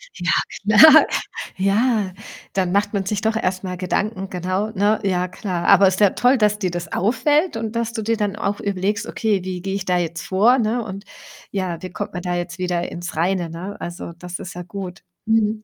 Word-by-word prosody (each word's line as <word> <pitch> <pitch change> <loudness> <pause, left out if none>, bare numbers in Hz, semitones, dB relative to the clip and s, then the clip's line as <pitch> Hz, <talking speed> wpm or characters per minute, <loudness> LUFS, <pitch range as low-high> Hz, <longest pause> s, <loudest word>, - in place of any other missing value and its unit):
Ja, - - -1 0.5
klar. 315 0 +9 0.5
Ja, 200 0 +1 0.4
dann 185 -2 0
macht 205 +2 +1
man 195 -2 -1
sich 205 +1 -1
doch 220 0 0
erst 185 -3 -1
mal 180 -1 -4
Gedanken, 190 +2 -2
genau, 185 +4 -2
ne? 210 +1 +2
Ja, 180 -2 +1
klar. 180 -2 -4
Aber 195 - +7
ist 185 +1 0
ja 205 -3 +5
toll, 250 +2 +3
dass 210 -1 +2
dir 185 -3 0
das 175 -2 -5
auffällt 260 - +1
und 225 0 -4
dass 230 0 -1
dir 225 0 0
dann 205 -2 -1
auch 205 -1 -2
überlegst: 200 +3 -1
„Okay, 205 -5 0
wie 185 -1 -4
gehe 195 +1 -3
ich 195 -1 -3
da 180 -1 +2
jetzt 170 -1 -2
vor“, 225 +7 +3
ne? 230 +2 0
Und 195 -1 -7 0.5
ja, 185 -4 -3
wie 185 - -6
kommt - - -6
man 180 - -4
da 175 0 -2
jetzt 175 0 -4
wieder 180 -1 -1
ins 175 -2 -6
Reine, 175 +1 0
ne? 180 +5 -6
Also, 170 0 -6
das 180 0 -6
ist 180 - -7
ja 180 - -6
gut. 180 0 -7 0.2
Mhm. 220 -1 +1
195 Hz, 205 wpm, -21 LUFS, 180-215 Hz, 0.5 s, klar